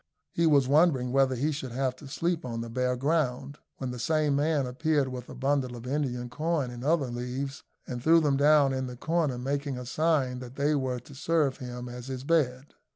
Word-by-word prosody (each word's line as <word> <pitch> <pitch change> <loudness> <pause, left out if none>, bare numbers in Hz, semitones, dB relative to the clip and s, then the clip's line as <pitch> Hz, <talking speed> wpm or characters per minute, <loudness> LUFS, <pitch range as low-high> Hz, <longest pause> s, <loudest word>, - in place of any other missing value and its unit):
He 170 0 +2
was 140 -4 +4
wondering 140 -4 +3
whether 135 -1 +3
he 145 +6 0
should 135 -4 -5
have 130 0 -1
to 140 - -11
sleep 170 +4 -1
on 115 -2 -4
the 115 0 -6
bare 125 +1 0
ground, 140 0 -1 0.2
when 130 -2 -4
the 125 - -6
same 150 +2 +1
man 145 -1 +1
appeared 145 +2 +1
with 125 -1 -7
a - - -8
bundle 135 -2 0
of 120 0 -9
Indian 125 -3 -2
corn 150 0 -1
and 120 0 -8
other 145 -4 +1
leaves, 125 +3 -4 0.2
and 125 -1 -5
threw 165 +5 +6
them 145 -3 +2
down 145 -1 +5
in 130 0 -2
the 125 -1 -8
corner, 160 -3 0
making 140 +1 -2
a 125 - -6
sign 140 -2 +1
that 125 0 -9
they 145 +2 +1
were 130 -3 -1
to 140 - -14
serve 145 -1 +1
him 125 -2 -6
as 125 +1 -8
his 130 -1 -5
bed. 140 -3 0
135 Hz, 215 wpm, -28 LUFS, 125-150 Hz, 0.2 s, threw